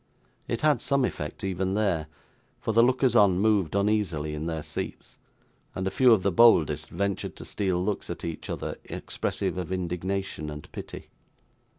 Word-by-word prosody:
It 115 - -2
had 150 -6 +3
some 140 0 +2
effect, - - -5
even 95 0 -1
there; 95 -8 0 0.5
for - - -2
the 115 +1 +5
lookers 125 0 +3
on 100 -5 +5
moved 100 -4 +2
uneasily 100 -7 0
in 75 +2 -4
their 80 -2 -3
seats; - - -6 0.6
and 95 - -2
a 95 - 0
few 125 +4 +5
of 105 -5 +4
the 100 - +2
boldest 80 -8 +5
ventured 100 -1 -2
to - - -9
steal 95 -3 -1
looks 105 -1 -2
at 85 - -5
each 85 -1 -6
other, - - -4
expressive - - -3
of 90 0 -5
indignation 90 -2 -3
and 75 0 -9
pity. - - -8
95 Hz, 170 wpm, -27 LUFS, 85-110 Hz, 0.6 s, the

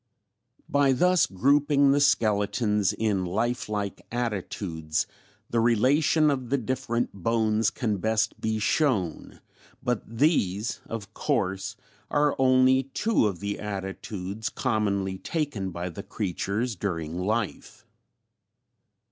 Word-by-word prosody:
] - - -55 0.2
"By 140 -1 +3
thus 180 +6 +3
grouping 140 +7 +3
the 140 - +3
skeletons 105 -5 +2
in 105 -3 0
lifelike 105 0 -2
attitudes, 95 -9 -2 0.5
the 115 - +2
relation 140 +7 +3
of 130 -4 -3
the 140 - +2
different 125 -1 -2
bones 110 +2 +1
can 110 -4 -2
best 110 +3 0
be 110 0 0
shown, 105 - 0 0.4
but 125 -4 0
these 115 - +1
of 110 -3 -6
course 95 +4 -1 0.3
are 145 0 +2
only 130 0 +5
two 220 - +2
of 95 -3 -4
the 100 0 -3
attitudes 100 +1 -5
commonly 100 -6 -1
taken 145 - -2
by 85 0 -4
the 90 +3 -6
creatures 105 +3 -2
during 85 -3 -3
life. 105 +3 -3
110 Hz, 115 wpm, -26 LUFS, 100-130 Hz, 0.5 s, only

